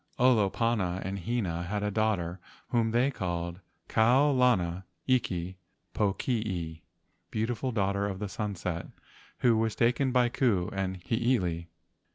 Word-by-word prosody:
Olopana 110 -5 +2
and 95 +1 -3
Hina 95 -5 -1
had 100 +4 -2
a 105 - 0
daughter 95 -5 0 0.3
whom 115 -2 +2
they 120 +5 +2
called 85 -5 -3 0.3
Kau 130 +6 +4
lana 95 -9 +2 0.2
iki 95 -8 0 0.3
pokii 95 -6 -1 0.5
(beautiful 120 +4 -1
daughter 100 -2 0
of 100 0 -4
sunset), 90 -4 -3 0.5
who 120 -2 +5
was 110 0 +1
taken 125 +3 +2
by 125 -1 +4
Ku 115 -7 +1
and 95 -1 -2
Hiilei. 90 -6 0
105 Hz, 120 wpm, -29 LUFS, 90-120 Hz, 0.5 s, who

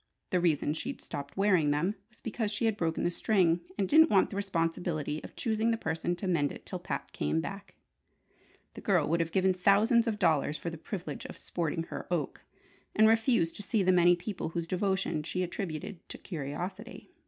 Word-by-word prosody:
The 180 - +3
reason 155 -4 +2
she'd 265 - -5
stopped 140 +3 -7
wearing 185 -7 +3
them 150 +7 +1 0.2
was 215 - -19
because 225 -1 -2
she 230 +2 -1
had 220 -2 +2
broken 165 -5 -1
the 175 - +1
string, 175 -3 +2 0.2
and 195 -2 +1
didn't 320 - +7
want 195 - +4
the - - -5
responsibility 165 -5 -1
of - - -10
choosing 225 -1 0
the 230 - +1
person 165 -2 -2
to 190 - -5
mend 155 -6 +2
it - - -10
till - - -5
Pat - - -5
came 75 +2 0
back. - - -6 1.0
The - - -9
girl - - +2
would 170 +2 +1
have 165 -1 -1
given 190 +1 +3
thousands 210 +6 +4
of 220 -2 0
dollars 155 -5 +2
for 170 - -4
the 165 - -7
privilege 200 +7 -6
of - - -8
"sporting 165 -1 -2
her - - -7
oak," 170 -6 -2 0.5
and 215 +1 +6
refusing 225 -6 +3
to - - -4
see 205 0 +1
the 185 - +4
many 175 -1 +6
people 180 -1 -4
whose 165 0 -3
devotion 185 -3 0
she 180 +4 -2
attributed 180 +1 -5
to - - -7
curiosity. 185 - -6
180 Hz, 200 wpm, -30 LUFS, 165-210 Hz, 1.0 s, didn't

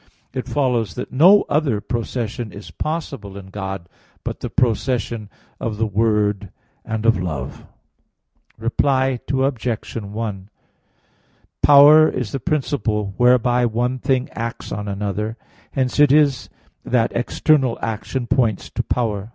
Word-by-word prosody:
It 130 - -4
follows 125 -6 0
that 125 - -5
no 180 +10 +6
other 145 -7 +1
procession 120 0 -4
is 100 - -10
possible 150 -11 -5
in 95 -1 -11
God 95 -3 -5 0.4
but - - -4
the - - -4
procession 115 -2 0 0.3
of 110 -2 -3
the 110 - +1
Word, 105 -2 0 0.3
and 110 0 -4
of 115 -5 +3
Love. 75 -8 -5 0.9
Reply 130 +3 +1
Obj. 130 -4 -1
1: 105 -2 -5 1.1
Power 145 +2 +8
is 125 -5 -3
the 135 - -3
principle 120 - -1
whereby 125 0 +4
one 120 +3 -1
thing 130 0 0
acts 115 0 -5
on 105 0 -4
another. 105 +2 -3 0.4
Hence 130 0 -1
it 145 -2 +6
is 145 -3 +3 0.3
that 120 -3 +1
external 130 +1 +1
action 115 +3 -3
points 115 -4 0
to - - -1
power. 110 -4 -2
115 Hz, 125 wpm, -21 LUFS, 105-130 Hz, 1.1 s, Power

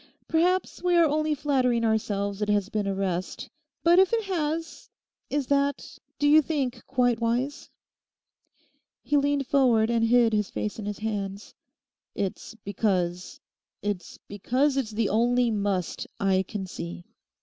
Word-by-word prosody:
Perhaps 360 +3 +1
we 360 -1 +2
are 340 -1 +6
only 305 0 +1
flattering 255 -5 +1
ourselves 205 -2 -1
it 210 - -1
has 205 -1 +1
been 210 -2 -2
a 195 - -1
rest. 185 -2 -3 0.3
But 340 +2 +6
if 380 -1 +4
it 455 -1 +2
has—is 320 -4 -4
that, 280 +1 -1 0.2
do 290 - +2
you 305 +2 +7
think, 265 -6 -2
quite 245 -3 +1
wise?' 245 +5 -1 1.3
He 295 - 0
leant 285 -1 +2
forward 245 -5 +3
and 230 -1 +1
hid 235 -1 +4
his 210 -2 0
face 210 +1 -4
in 205 - -5
his 205 - -4
hands. 200 -2 -4 0.6
'It's 200 +3 -4
because—it's 180 -3 -1 0.9
because 255 +8 0
it's 265 -5 -1
the 215 -1 -1
only 240 +2 +2
"must" 200 -4 -2
I 190 -1 +2
can 205 -3 -4
see. 85 - -7
235 Hz, 140 wpm, -26 LUFS, 205-285 Hz, 1.3 s, you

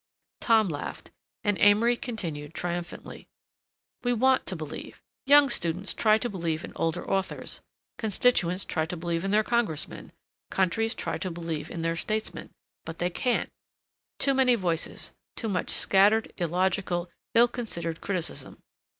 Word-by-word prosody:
Tom 220 -3 +4
laughed, 145 -4 -6 0.3
and 205 -3 +1
Amory 215 +4 +5
continued 165 - -5
triumphantly. 175 0 -5 0.8
"We 245 0 +2
want 260 +3 +3
to 185 - -1
believe. 155 -2 -7 0.3
Young 290 0 +8
students 180 -4 -1
try 215 -1 +4
to 240 - -1
believe 170 -6 -2
in - - -8
older 165 +1 -1
authors, 195 -1 -2 0.4
constituents 200 -4 +2
try 160 -2 -1
to 180 - -4
believe 170 +1 -2
in 195 - -1
their 210 +2 +4
Congressmen, 220 -10 -1 0.4
countries 225 +5 +1
try - - -3
to 185 - -2
believe 165 -3 -4
in 165 - -5
their 165 0 0
statesmen, 215 +6 -3 0.3
but 165 0 -7
they 175 +1 -1
can't. 245 +7 0 0.7
Too 275 - +2
many 260 -2 +4
voices, 170 -6 -2 0.2
too 225 - -3
much 185 -3 -1
scattered, 205 +3 +3
illogical, 175 0 0 0.2
ill 235 +1 +7
considered 170 -10 -3
criticism. 185 -4 -4
190 Hz, 140 wpm, -27 LUFS, 170-225 Hz, 0.8 s, Young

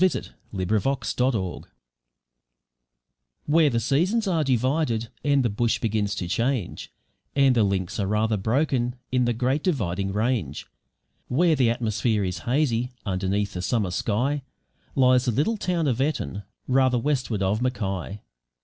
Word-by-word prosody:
JOHNSON, 185 -1 +1 0.2
ALIAS 105 +8 0
CROW 115 -8 0 1.8
Where 155 0 +4
the 120 -3 0
seasons 175 - +1
are 165 -4 +2
divided 130 -2 0
and 140 -2 +3
the - - +2
bush 115 +3 +1
begins 105 -2 -1
to 90 - -3
change, 115 +2 -2 0.4
and 135 -2 +4
the 115 - +4
links 95 -2 -1
are 100 - 0
rather 110 +2 +1
broken 120 +3 0 0.2
in 125 -1 +2
the 120 - +1
Great 130 +5 0
Dividing 100 - -1
Range; 105 - -1 0.6
where 165 +5 +3
the 130 -4 +3
atmosphere 110 -2 0
is 90 -2 -3
hazy 125 -3 +1 0.2
underneath 100 +1 -1
the 90 - -4
summer 100 0 0
sky, 125 +10 0 0.5
lies 130 -1 +4
the 125 - +2
little 150 - +1
town 175 -5 0
of 130 -1 0
Eton, 135 -8 -1 0.3
rather 130 -1 +3
westward 125 -6 -1
of 100 +4 0
Mackay. 100 -5 -2
120 Hz, 140 wpm, -25 LUFS, 105-135 Hz, 1.8 s, Where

